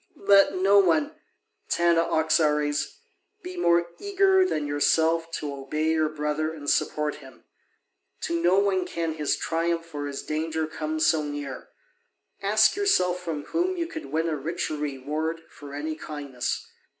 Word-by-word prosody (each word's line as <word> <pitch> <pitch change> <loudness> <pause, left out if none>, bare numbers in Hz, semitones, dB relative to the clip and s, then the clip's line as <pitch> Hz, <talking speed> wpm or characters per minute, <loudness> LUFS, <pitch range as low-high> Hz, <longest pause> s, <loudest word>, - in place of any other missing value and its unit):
Let 195 -1 +6
no 195 +2 +5
one, 165 -6 +2 0.6
Tanaoxares, 160 - +1 0.4
be 365 +1 -7
more 170 - +3
eager 390 -1 +3
than 155 - -1
yourself 160 +3 +2
to 145 -3 -3
obey 150 +3 -1
your 155 -1 +2
brother 150 +1 -2
and 150 -3 -9
support 150 +1 0
him: 135 -2 -15 0.8
to 170 0 -1
no 175 +2 +4
one 195 -2 +2
can 165 -1 -2
his 150 -2 0
triumph 165 0 -2
or 145 -1 -3
his 140 -1 -5
danger 160 +1 -2
come 155 0 -4
so 160 0 +3
near. 145 -3 -6 0.7
Ask 210 +2 +4
yourself 180 - +2
from 160 -4 -4
whom 360 - -1
you 340 - -1
could 320 -1 -7
win 160 +2 -1
a 160 - 0
richer 155 +2 -3
reward 150 +3 -3
for 145 -1 -10
any 155 +2 -3
kindness. 145 -5 -4
160 Hz, 145 wpm, -26 LUFS, 150-180 Hz, 0.8 s, Let